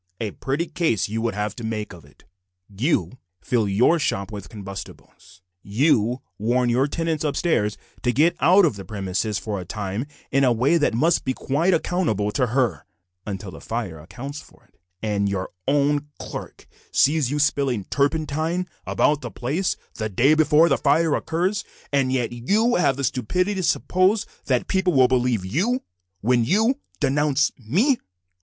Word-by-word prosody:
"A 110 Hz, -3 st, -2 dB
pretty 140 Hz, -, -2 dB
case 160 Hz, -, 0 dB
you 110 Hz, +1 st, -2 dB
would 115 Hz, -3 st, -1 dB
have 105 Hz, 0 st, -2 dB
to 120 Hz, -, -7 dB
make 110 Hz, -3 st, -4 dB
out 90 Hz, -, -11 dB
of 75 Hz, -, -19 dB
it. 70 Hz, -, -22 dB, 0.4 s
You 125 Hz, -, -1 dB, 0.2 s
fill 115 Hz, -5 st, 0 dB
your 120 Hz, +12 st, +3 dB
shop 105 Hz, -9 st, -1 dB
with 100 Hz, -3 st, -7 dB
combustibles, 95 Hz, -2 st, -10 dB, 0.2 s
you 120 Hz, +2 st, +1 dB, 0.2 s
warn 120 Hz, +3 st, +1 dB
your 130 Hz, +4 st, +2 dB
tenant 165 Hz, 0 st, -2 dB
upstairs 140 Hz, -8 st, 0 dB, 0.2 s
to 125 Hz, -, +1 dB
get 155 Hz, +8 st, +3 dB
out 185 Hz, +3 st, +6 dB
of 125 Hz, -11 st, 0 dB
the 100 Hz, -, -7 dB
premises 100 Hz, +2 st, -2 dB
for 105 Hz, -1 st, -4 dB
a -, -, -5 dB
time 105 Hz, +6 st, -4 dB, 0.2 s
in 135 Hz, +1 st, +3 dB
a 125 Hz, -, +4 dB
way 125 Hz, +8 st, +3 dB
that 145 Hz, -6 st, +1 dB
must 160 Hz, +8 st, +2 dB
be 130 Hz, -1 st, -1 dB
quite 145 Hz, +6 st, -1 dB
unaccountable 110 Hz, -, 0 dB
to 125 Hz, +2 st, +1 dB
her 120 Hz, -, 0 dB, 0.4 s
(until 95 Hz, -1 st, -5 dB
the -, -, -11 dB
fire 110 Hz, -9 st, -4 dB
accounts 130 Hz, -, -8 dB
for -, -, -20 dB
it), -, -, -37 dB, 0.2 s
and 100 Hz, -2 st, 0 dB
your 95 Hz, -2 st, -3 dB, 0.2 s
own 145 Hz, +1 st, +2 dB
clerk -, -, -8 dB, 0.3 s
sees 145 Hz, -2 st, +3 dB
you 145 Hz, -, -1 dB
spilling 140 Hz, -7 st, +1 dB
turpentine 155 Hz, -, -1 dB, 0.2 s
about 150 Hz, 0 st, +2 dB
the -, -, -5 dB
place 150 Hz, +10 st, -2 dB, 0.2 s
the 110 Hz, 0 st, -1 dB
day 125 Hz, +9 st, +4 dB
before 155 Hz, +1 st, +5 dB
the 140 Hz, -, +2 dB
fire 150 Hz, +2 st, +3 dB
occurs, 180 Hz, +8 st, -1 dB, 0.3 s
and 135 Hz, -2 st, +2 dB
yet 125 Hz, -3 st, 0 dB
you 205 Hz, -, +1 dB
have 140 Hz, -7 st, +2 dB
the 140 Hz, -, -3 dB
stupidity 180 Hz, -, 0 dB
to 190 Hz, -, -2 dB
suppose 185 Hz, +4 st, +2 dB, 0.2 s
that 125 Hz, -2 st, +1 dB
people 190 Hz, -2 st, +1 dB
will 130 Hz, -2 st, +6 dB
believe 125 Hz, -6 st, +1 dB
you 200 Hz, -, 0 dB, 0.4 s
when 120 Hz, +2 st, +3 dB
you 220 Hz, -, +2 dB, 0.2 s
denounce 145 Hz, 0 st, +2 dB
me!" 200 Hz, -, +2 dB
130 Hz, 170 wpm, -23 LUFS, 110-155 Hz, 0.4 s, out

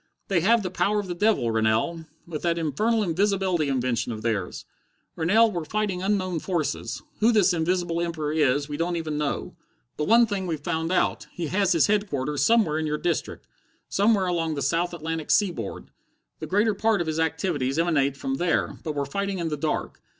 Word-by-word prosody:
They 190 Hz, -3 st, +3 dB
have 225 Hz, +4 st, +3 dB
the 185 Hz, -, -3 dB
power 195 Hz, +4 st, +1 dB
of 205 Hz, -, -3 dB
the 180 Hz, -, -4 dB
devil, 175 Hz, -, +2 dB
Rennell, 110 Hz, +10 st, 0 dB, 0.2 s
with 160 Hz, -3 st, -6 dB
that 170 Hz, -1 st, 0 dB
infernal 210 Hz, -, +1 dB
invisibility 185 Hz, -3 st, +1 dB
invention 125 Hz, -3 st, -1 dB
of 110 Hz, -1 st, -6 dB
theirs. 105 Hz, -6 st, -2 dB, 0.5 s
Rennell, 215 Hz, +8 st, +4 dB
we're 175 Hz, -4 st, -3 dB
fighting 200 Hz, +1 st, -2 dB
unknown 185 Hz, -3 st, 0 dB
forces. 155 Hz, -5 st, -3 dB, 0.2 s
Who 225 Hz, +2 st, +4 dB
this 200 Hz, -5 st, +4 dB
Invisible 170 Hz, 0 st, 0 dB
Emperor 160 Hz, -3 st, -2 dB
is, 145 Hz, -2 st, +2 dB
we 145 Hz, -1 st, -5 dB
don't 170 Hz, +2 st, -1 dB
even 155 Hz, -3 st, -3 dB
know. 150 Hz, -2 st, -3 dB, 0.4 s
But 150 Hz, -, -1 dB
one 235 Hz, +2 st, +6 dB
thing 200 Hz, -4 st, -3 dB
we've 160 Hz, -3 st, -2 dB
found 160 Hz, +3 st, -2 dB
out. 185 Hz, -, 0 dB
He 175 Hz, -, -4 dB
has 190 Hz, 0 st, +2 dB
his 165 Hz, -, +4 dB
headquarters 150 Hz, -10 st, 0 dB
somewhere 205 Hz, -5 st, +3 dB
in 160 Hz, -, -1 dB
your 150 Hz, 0 st, -1 dB
district. 170 Hz, 0 st, -2 dB, 0.4 s
Somewhere 200 Hz, -1 st, +3 dB
along 165 Hz, -3 st, -1 dB
the 140 Hz, -, -2 dB
south 170 Hz, +6 st, +1 dB
Atlantic 160 Hz, -1 st, -4 dB
seaboard. 175 Hz, -, 0 dB, 0.5 s
The -, -, -5 dB
greater 210 Hz, +3 st, +2 dB
part 220 Hz, +1 st, +1 dB
of 175 Hz, -, -1 dB
his 160 Hz, 0 st, -2 dB
activities 160 Hz, -4 st, -1 dB
emanate 145 Hz, -5 st, +1 dB
from 135 Hz, 0 st, -2 dB
there. 175 Hz, +1 st, 0 dB
But 155 Hz, -, -3 dB
we're 140 Hz, -1 st, -1 dB
fighting 200 Hz, +6 st, -2 dB
in 170 Hz, -2 st, -2 dB
the 150 Hz, -, -2 dB
dark. 150 Hz, +1 st, -3 dB
170 Hz, 190 wpm, -25 LUFS, 150-195 Hz, 0.5 s, one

